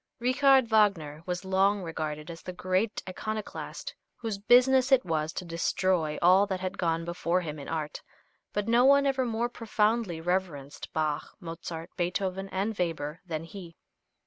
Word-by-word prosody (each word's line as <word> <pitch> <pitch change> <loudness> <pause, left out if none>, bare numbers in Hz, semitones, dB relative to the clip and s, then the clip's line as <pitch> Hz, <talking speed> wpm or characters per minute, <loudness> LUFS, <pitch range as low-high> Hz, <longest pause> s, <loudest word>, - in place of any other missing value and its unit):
Richard 265 +2 +4
Wagner 195 -9 +2
was 180 +1 -3
long 195 +1 +2
regarded 155 -1 -4
as 165 - -10
the 180 - -7
great 185 +4 -1
iconoclast 215 +3 -5 0.2
whose 220 -4 -4
business 255 +4 +5
it 265 -2 +5
was 160 -2 -1
to 185 - -5
destroy 170 -1 0
all 185 +3 +6
that 190 -2 -2
had 185 +1 -4
gone 165 -1 0
before 170 +1 0
him 155 -3 -6
in 140 - -8
art, 155 -2 -3 0.5
but 205 0 -2
no 235 +2 +4
one 280 +1 +6
ever 265 -2 +1
more 230 +1 0
profoundly 220 -5 0
reverenced 165 -5 -3
Bach, 155 -1 -2
Mozart, 165 -1 -7
Beethoven 190 +2 -2
and 200 +4 -2
Weber 165 -4 -3
than 160 -2 -3
he. 170 -1 -10
185 Hz, 155 wpm, -28 LUFS, 165-215 Hz, 0.5 s, all